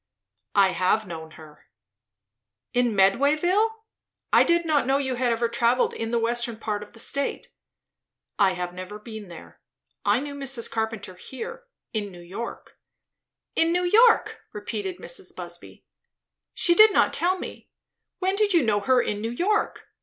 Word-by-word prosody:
"I 200 -2 +6
have 185 +4 +1
known 160 -3 -8
her." 155 -2 -15 1.1
"In 245 -3 +2
Medwayville? 300 - +3 0.6
I - - +7
did 340 0 +2
not 295 -5 +2
know 270 +1 +3
you 265 -2 -1
had 245 -1 0
ever 235 +1 +1
travelled 235 +2 +2
in 225 - -4
the 235 - +1
western 235 0 0
part 210 -2 -3
of 210 - -11
the 230 - -12
state." 280 +4 -2 0.9
"I 195 -2 +4
have 180 0 -4
never 185 +3 -7
been 215 -1 -9
there. 85 - -13 0.4
I 205 +3 +3
knew 285 +1 -6
Mrs. 270 -4 -2
Carpenter 220 -4 -3
here, 470 - -8 0.3
in 205 -3 -3
New 175 - -12
York." 185 +7 -8 0.8
"In 330 0 +3
New 360 +1 +1
York!" 450 +6 +4
repeated 380 -3 -4
Mrs. - - -4
Busby. - - -9 0.7
"She 345 - +4
did 430 +4 +8
not - - +3
tell 365 +2 +1
me - - -9 0.5
When 380 +1 0
did 405 -2 +2
you 330 - +5
know 210 -3 +2
her 255 +4 +3
in 205 0 -3
New 225 - -2
York? 390 - -1
235 Hz, 160 wpm, -25 LUFS, 205-330 Hz, 1.1 s, did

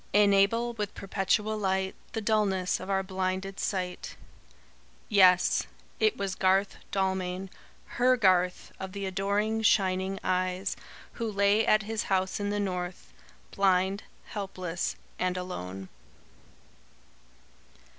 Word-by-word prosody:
"Enable 205 +4 +4
with 210 -3 -4
perpetual 205 +3 0
light 190 -1 0 0.2
The 225 - -2
dulness 205 -4 +1
of - - -8
our 195 0 +1
blinded 190 0 -3
sight." 180 -2 -3 0.9
Yes 185 -4 +5 0.3
it 435 -1 +2
was 195 -1 -2
Garth 190 +1 +2
Dalmain 190 -1 -1 0.3
HER 250 +1 +2
Garth, 185 -4 +2
of 190 -1 -6
the 200 -1 -4
adoring 200 +3 0
shining 190 -2 +2
eyes 185 +1 0 0.4
who 230 -2 -3
lay 200 +2 +3
at 215 0 +4
his 220 +1 -3
house 190 0 0
in 205 0 -1
the 205 0 -1
North; 180 -2 -4 0.4
blind, 190 +1 +2 0.3
helpless, 185 -4 -3 0.2
and 185 0 0
alone. 95 - -6
195 Hz, 115 wpm, -29 LUFS, 185-205 Hz, 0.9 s, Yes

